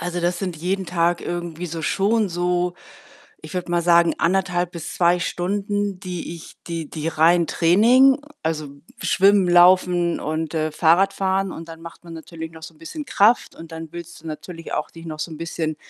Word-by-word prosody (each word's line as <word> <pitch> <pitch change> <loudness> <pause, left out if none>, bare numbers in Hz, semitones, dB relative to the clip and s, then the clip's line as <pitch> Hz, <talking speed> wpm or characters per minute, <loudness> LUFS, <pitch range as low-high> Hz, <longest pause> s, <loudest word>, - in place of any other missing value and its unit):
also, 175 +1 -3
das 175 0 0
sind 180 -4 -4
jeden 185 +3 -2
Tag 170 0 +1
irgendwie 175 0 -5
so 165 0 -5
schon 205 +2 +1
so, 175 0 0 0.7
ich - - -9
würde 175 -1 -3
mal 175 - +2
sagen, 170 0 +4
1,5 180 0 +1
bis 170 -3 -7
2 175 0 +3
Stunden, 200 +2 -2
die 180 -3 -6
ich 165 - -13
die 165 -3 -4
die 160 0 -4
rein 165 +2 +3
Training, 245 - +5 0.2
also, 155 -2 -2 0.3
schwimmen, 195 -1 +4
laufen 175 -1 +4
und, 155 +1 -3
äh, 155 0 0
fahrradfahren 190 +4 +2
und 165 -1 -8
dann 165 0 -10
macht 170 +1 -11
man 170 - -10
natürlich 160 0 -8
noch 160 0 -13
so 165 - -9
'n - - -24
bisschen 295 - -7
Kraft 225 -1 +2
und 165 0 -11
dann 160 -1 -7
willst 170 -2 -10
du 165 - -8
natürlich 165 +2 -8
auch - - -3
dich 165 0 -11
noch 155 -1 -6
so 160 +2 -4
'n 155 - -7
bisschen 160 -2 -3
175 Hz, 190 wpm, -22 LUFS, 165-185 Hz, 0.7 s, Training